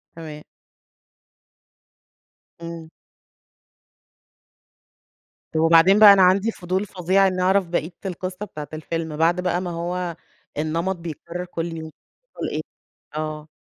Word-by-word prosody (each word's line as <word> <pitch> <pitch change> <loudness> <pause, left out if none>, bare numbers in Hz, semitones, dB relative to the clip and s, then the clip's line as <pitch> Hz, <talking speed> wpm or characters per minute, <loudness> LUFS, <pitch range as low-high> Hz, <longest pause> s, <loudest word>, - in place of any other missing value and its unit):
تمام. 155 -2 -8 2.2
امم. 165 -1 -8 2.6
طب، 155 - -1
وبعدين 165 +5 +6
بقى 210 -2 +11
أنا 195 - +4
عندي 190 +4 +4
فضول 185 0 -2
فظيع 190 0 +2
إنّي 185 -1 -1
أعرف 190 0 +3
بقية 170 0 -2
القصّة 185 +1 -4
بتاعة 150 -6 -8
الفيلم، 160 0 -4
بعد 170 +3 +2
بقى 180 0 0
ما 180 -1 -4
هو 175 +1 -3 0.4
النمط 165 +5 -1
بيتكرر 170 +1 -6
كل 170 -2 -4
يوم، 160 0 -7 0.3
بيحصل - - -6
إيه؟ - - -1 0.5
آه. 155 0 -4
175 Hz, 115 wpm, -23 LUFS, 160-185 Hz, 2.6 s, بقى